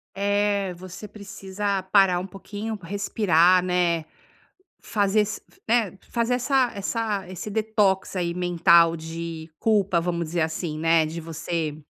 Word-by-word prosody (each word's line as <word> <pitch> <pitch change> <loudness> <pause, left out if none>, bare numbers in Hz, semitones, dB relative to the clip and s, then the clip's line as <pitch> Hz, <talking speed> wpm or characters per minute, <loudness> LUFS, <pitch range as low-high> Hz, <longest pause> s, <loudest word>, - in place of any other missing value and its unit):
É, 200 -1 0
você 185 +3 -9
precisa 200 -1 -4
parar 190 -2 +4
um 180 - -4
pouquinho, 205 +2 -6
respirar, 185 -1 +3
né. 175 -3 +1 0.8
Fazer 205 0 +1
ess 210 +1 -2 0.3
né, 220 -5 +1
fazer 235 +1 0
essa 255 0 +2
essa 205 -1 -2
esse 185 +3 -6
detox 210 -3 +1
aí 175 -2 -1
mental 170 -1 +4
de 165 0 -7
culpa, 200 -5 +2
vamos 170 0 -2
dizer 170 +2 -1
assim, 160 0 -2
né, 165 0 +3
de 160 +2 -5
você... 160 -1 -4
190 Hz, 130 wpm, -24 LUFS, 170-205 Hz, 0.8 s, parar